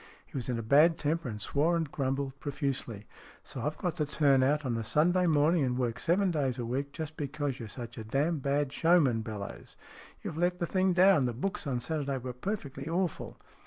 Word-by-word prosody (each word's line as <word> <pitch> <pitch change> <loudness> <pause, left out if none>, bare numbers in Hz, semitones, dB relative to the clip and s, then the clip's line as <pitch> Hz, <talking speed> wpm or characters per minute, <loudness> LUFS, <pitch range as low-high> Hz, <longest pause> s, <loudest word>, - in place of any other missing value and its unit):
He - - -17
was 130 -2 -3
in 125 - 0
a 115 - -3
bad 150 +8 +5
temper, 155 -2 -1
and 105 -2 -6
swore 155 +9 +1
and 160 -4 -2
grumbled 135 0 -2
profusely. 135 -7 -3 0.4
"So 130 - -7
I've 150 +5 -2
got 180 -2 -2
to 150 - +1
turn 140 -3 +3
out 145 +3 +2
on 115 -3 -1
Sunday 175 - +2
morning 155 +1 +3
and 125 -1 0
work 120 -2 -1
seven 185 +3 +2
days 135 -6 0
a 120 - -3
week, 135 +4 -2
just 155 0 -6
because 145 -2 -3
you're 115 -3 -7
such 120 +1 -7
a - - -5
damn 145 +8 0
bad 140 0 0
showman, 160 -9 +3
Bellowes? 105 -2 -7 0.5
You've 160 - -5
let 175 +1 +1
the 175 - -1
thing 185 +1 +2
down. 180 -5 +5
The 120 - -1
books 190 - -3
on 125 -3 -1
Saturday 140 -2 -2
were 125 0 -5
perfectly 140 - -5
awful." 175 0 -2
140 Hz, 205 wpm, -30 LUFS, 125-165 Hz, 0.5 s, bad